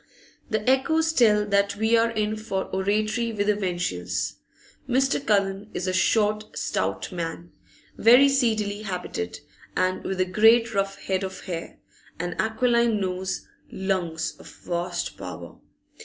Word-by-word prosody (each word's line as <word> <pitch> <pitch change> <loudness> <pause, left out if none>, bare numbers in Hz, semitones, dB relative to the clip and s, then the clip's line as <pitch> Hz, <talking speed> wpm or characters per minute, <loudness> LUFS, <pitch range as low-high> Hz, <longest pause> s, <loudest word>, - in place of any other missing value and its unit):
The 215 -1 -2
echoes 315 +5 +3
tell 210 -6 +4
that 200 0 +1
we 220 +3 +2
are 230 0 +3
in 215 -1 -1
for 215 -3 -3
oratory 215 +4 0
with 205 -2 -1
a 210 - +3
vengeance. 100 - -2 0.5
Mr. 270 +2 +2
Cullen 200 -3 +1
is 175 - -2
a 185 - -1
short, 210 +2 +1
stout - - -2
man, 170 -1 -5 0.5
very 245 +5 +7
seedily 220 -6 +1
habited, 180 - -4 0.6
with 190 -1 -3
a 185 - +3
great 225 +4 +4
rough 195 0 -1
head 190 0 -1
of 190 -1 -5
hair, 170 -2 -6 0.4
an 175 0 -2
aquiline 235 0 +2
nose, 190 0 -3 0.2
lungs 185 -4 -2
of - - -13
vast 175 0 -4
power. 85 -2 -8
205 Hz, 135 wpm, -25 LUFS, 185-225 Hz, 0.6 s, very